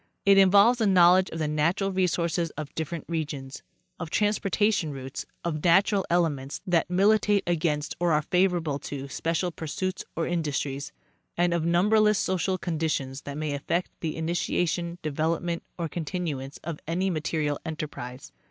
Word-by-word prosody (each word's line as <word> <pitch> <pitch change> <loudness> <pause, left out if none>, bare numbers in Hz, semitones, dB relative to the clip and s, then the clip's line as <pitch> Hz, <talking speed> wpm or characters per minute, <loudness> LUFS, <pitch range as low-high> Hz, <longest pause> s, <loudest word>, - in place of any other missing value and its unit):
It 200 0 +7
involves 200 +5 +6
a 220 - +3
knowledge 185 0 +6
of - - -6
the 155 -2 -1
natural 165 +6 +1
resources 170 -2 0
of 150 -1 -6
different 160 0 -4
regions, 145 -5 -4 0.4
of 170 -3 -5
transportation 205 -2 +1
routes, 135 -1 -6 0.2
of 155 -3 -2
natural 190 +3 +4
elements 150 -6 0
that 175 -3 +1
militate 205 +2 +3
against 155 -3 -1
or 175 -1 +2
are 150 0 +2
favorable 175 -5 +1
to 140 -1 -6
special 165 +5 -1
pursuits 175 +4 -4
or 165 - -1
indus 160 -5 -1
tries, 140 +1 -4 0.5
and 175 0 +2
of 170 -2 0
numberless 210 +4 +4
social 185 0 0
conditions 155 -6 -2
that 145 0 -5
may 155 -1 -2
affect 170 +5 -2
the 160 -2 -3
ini 160 +1 -2
tiation, 175 0 -1
development 165 +3 -1 0.2
or 170 -2 -2
continuance 155 -5 -4
of 160 -2 -5
any 185 +4 0
material 155 -2 -1
enterprise. 150 -5 -6
170 Hz, 150 wpm, -27 LUFS, 150-185 Hz, 0.5 s, It